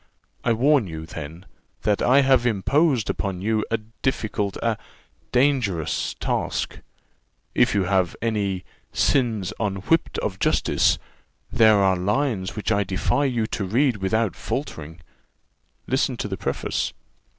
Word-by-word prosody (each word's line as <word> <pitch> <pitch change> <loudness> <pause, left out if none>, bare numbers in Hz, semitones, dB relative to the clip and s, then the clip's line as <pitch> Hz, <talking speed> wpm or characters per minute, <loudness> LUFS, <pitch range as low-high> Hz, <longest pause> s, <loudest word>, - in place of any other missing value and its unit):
I 120 - +2
warn 130 -1 +3
you, 80 -1 -6
then, 80 +3 -8 0.4
that 105 -1 +1
I 135 +3 +5
have 130 -2 +4
imposed 125 - +2
upon 95 -3 -2
you 110 0 +1
a 115 - +1
difficult, 110 -3 -3
a 115 -3 0 0.5
dangerous 125 - +1
task. - - -2 0.7
If - - +3
you 100 - +3
have 95 -2 +1
any 100 -5 -1 0.3
'sins 115 -9 +1
unwhipt 105 - 0
of 95 -2 -3
justice,' - - +2 0.5
there 110 -2 +6
are 95 -1 +4
lines 100 0 -1
which 105 +1 -2
I 100 -1 +3
defy 110 +8 0
you 120 -5 0
to 100 - -1
read 120 +5 +2
without 105 +3 0
faltering 80 - -5 0.8
listen 130 0 0
to 105 - -3
the 95 - -3
preface." - - -2
110 Hz, 130 wpm, -24 LUFS, 95-125 Hz, 0.8 s, there